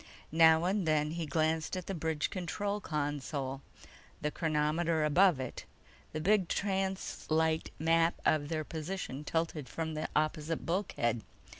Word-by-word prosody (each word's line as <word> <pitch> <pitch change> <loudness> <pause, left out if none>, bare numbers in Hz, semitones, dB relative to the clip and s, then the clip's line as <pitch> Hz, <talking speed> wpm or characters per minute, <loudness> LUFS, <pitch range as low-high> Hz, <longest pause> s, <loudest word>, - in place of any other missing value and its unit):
Now 160 0 +6
and 190 -1 +1
then 150 -1 +2
he 165 -1 -3
glanced 160 +3 0
at 180 - -5
the 195 - -3
bridge 160 -3 -1
control 200 +3 -2
console, 145 -4 -3 0.6
the 150 - -1
chronometer 155 +1 +1
above 175 0 +5
it, 130 - -5 0.5
the 155 - -3
big 190 +2 +3
translite 190 -5 0
map 165 +1 +3
of 145 -2 +2
their 155 -1 -1
position 155 -3 -5
tilted 160 -4 -2
from 160 +2 -3
the 155 - -3
opposite 155 +1 0
bulkhead. 165 - 0
160 Hz, 135 wpm, -32 LUFS, 150-175 Hz, 0.6 s, Now